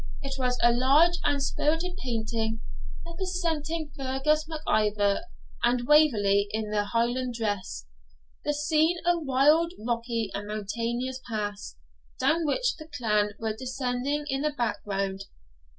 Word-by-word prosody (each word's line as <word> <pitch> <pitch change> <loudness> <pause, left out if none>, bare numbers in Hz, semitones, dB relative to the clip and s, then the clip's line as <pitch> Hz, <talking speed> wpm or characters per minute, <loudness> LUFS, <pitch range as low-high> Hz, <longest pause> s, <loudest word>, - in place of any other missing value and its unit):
It 275 -1 -3
was 250 -1 +1
a 240 0 +6
large 290 +8 +4
and 280 -1 +1
spirited 325 +6 0
painting, 225 -2 -2 0.4
representing 335 -3 -2
Fergus 280 +3 0
Mac 315 -1 -5
Ivor 205 -2 +2 0.4
and 240 0 +2
Waverley 210 -10 +5
in 215 0 -3
their 205 -1 +1
Highland 240 +3 0
dress, 205 - -3 0.6
the 295 - +1
scene 310 +3 +2
a 345 0 +3
wild, 305 +4 +3
rocky, 230 -1 -2
and 205 +1 -4
mountainous 235 +5 -3
pass, 205 - -4 0.4
down 330 -1 +2
which - - +1
the 310 -2 -10
clan 210 -7 0
were 220 -1 -2
descending 255 +3 -2
in 270 -1 -1
the 300 - +2
background. 200 -7 -2
250 Hz, 130 wpm, -27 LUFS, 215-300 Hz, 0.6 s, a